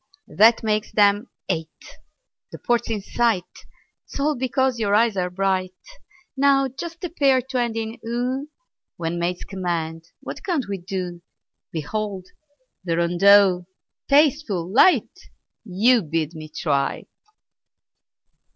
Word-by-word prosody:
That 225 +7 +5
makes 215 -1 -1
them 205 +2 +3 0.2
eight. 160 -1 -6 0.5
The - - -8
port's 240 -1 0
in 210 -3 -2
sight 230 -4 +1 0.7
'Tis - - -7
all 295 +2 +1
because 260 -1 0
your 205 -2 +1
eyes 225 -1 +3
are 180 -1 -1
bright! 185 0 -1 0.6
Now 275 0 +3
just 335 +7 -8
a 355 - -2
pair 275 -5 +3
to 255 0 -3
end 235 -2 -1
in 225 0 -4
"oo" 250 +5 -3 0.5
When 170 0 -3
maids 175 +1 -2
command, 165 -4 -4
what - - -8
can't 330 - -1
we 200 -1 -4
do? 180 -1 -5 0.5
Behold! 190 +4 -4 0.5
the 170 -2 -1
rondeau, 180 +1 +4 0.4
tasteful, 280 - +2
light, 355 +9 +5 0.5
You 225 +4 +3
bid 160 -1 -2
me 155 -1 -9
try! 140 -3 -1
205 Hz, 125 wpm, -22 LUFS, 180-250 Hz, 0.7 s, That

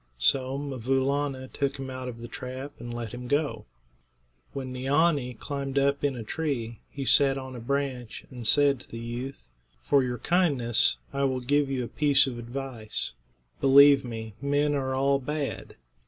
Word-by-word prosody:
So 130 - +2
'Mvoo 135 -2 -1
Laana 140 -2 -1
took 140 -1 -1
him 135 -1 -6
out 130 0 -5
of 120 -2 -6
the 120 - -6
trap 130 +3 -6
and 120 - -7
let 120 -2 -5
him 125 0 -6
go. 145 +2 -1 0.8
When 130 -2 -5
Neeanee 140 0 +2
had - - -21
climbed 140 -1 -4
up 140 +1 +2
in 140 -2 +1
a 120 - -5
tree, 120 -4 -3
he 140 -1 -5
sat 135 0 +5
on 130 -1 -7
a - - -6
branch 130 -1 -3
and 120 -3 -5
said 140 -1 +4
to - - -14
the 115 - -7
youth: 120 +4 -6 0.4
"For 140 - +4
your 125 -1 -2
kindness 140 -8 +2 0.2
I 140 0 +1
will 130 -1 0
give 140 +3 +1
you 130 -2 -1
a - - -4
piece 145 0 +4
of 125 -3 -5
advice: 120 -2 -4 0.5
Believe 140 +1 +7
me, 110 -3 -6
men 145 +1 +1
are 130 -2 -1
all 140 +1 +2
bad. 145 +1 -4
135 Hz, 180 wpm, -27 LUFS, 125-140 Hz, 0.8 s, Believe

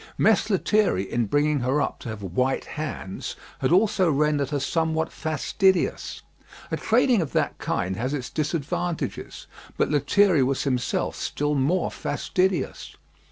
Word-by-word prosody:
Mess 220 +1 +3
Lethierry 200 - +2
in 115 +3 -1
bringing 145 +5 +2
her 130 +4 +1
up - - -2
to - - -7
have 110 -2 -6
white 125 +9 0
hands 145 -11 -5 0.2
had - - 0
also 190 -1 +4
rendered 145 -1 +1
her 145 -2 -1
somewhat 160 +2 0
fastidious. 175 +4 0 0.5
A - - 0
training 240 -1 +3
of 155 - -4
that - - 0
kind 95 +1 -1
has 125 +4 -2
its 135 -4 -4
disadvantages; 160 +2 -3 0.3
but - - +1
Lethierry 160 +3 +3
was 130 +1 +1
himself 125 -3 -1
still 145 0 -2
more 150 +7 +1
fastidious. 185 -6 -1
150 Hz, 140 wpm, -25 LUFS, 130-180 Hz, 0.5 s, also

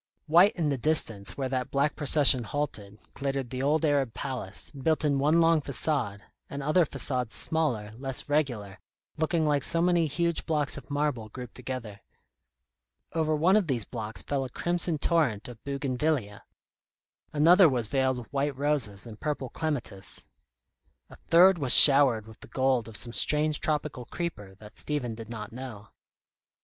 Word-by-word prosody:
White 175 +7 +4
in 160 -4 -1
the 140 -3 -2
distance 115 -9 +2
where 135 -2 -2
that 130 0 -3
black 140 +2 0
procession 145 -3 +4
halted, 105 -6 -5
glittered 135 -3 -4
the 130 0 -4
old 155 +4 +1
Arab 140 -6 0
palace, 125 -8 -5
built 155 +3 -1
in 140 -2 +1
one 150 +4 +2
long 165 -1 +3
façade, 130 -6 -3 0.3
and 140 0 -6
other 155 +3 +2
façades 125 -5 -2
smaller, 125 -10 -2
less 135 -1 -3
regular, 125 -10 -2 0.4
looking 160 +1 0
like 145 -2 +1
so 165 - 0
many 170 -1 +2
huge 170 +3 -2
blocks 150 -3 +1
of 140 - -9
marble 145 -6 -2
grouped 125 +1 -10
together. 120 -5 -8 1.1
Over 155 -1 0
one 170 +6 +2
of 210 -5 +1
these 125 -7 -2
blocks 110 -2 -6
fell 140 -2 -2
a 130 - -7
crimson 170 +3 -1
torrent 145 - 0
of 120 -3 -13
bougainvillæa; 140 -5 -3 0.9
another 165 +4 +5
was 125 -4 -1
veiled 130 0 0
with 125 +2 -11
white 140 0 -2
roses 135 -9 0
and 110 -2 -11
purple 145 -4 -4
clematis; 135 -11 -5 0.9
a - - -12
third 180 +2 +5
was 135 -4 +8
showered 135 -6 +7
with 110 0 -15
the - - -13
gold 130 -4 0
of 110 -2 -6
some 120 - -3
strange 150 +2 +1
tropical 150 -5 -3
creeper 105 - -7
that 105 +2 -15
Stephen 140 -6 -3
did 110 0 -10
not 105 -3 -8
know. 115 -5 -9
140 Hz, 160 wpm, -27 LUFS, 120-155 Hz, 1.1 s, was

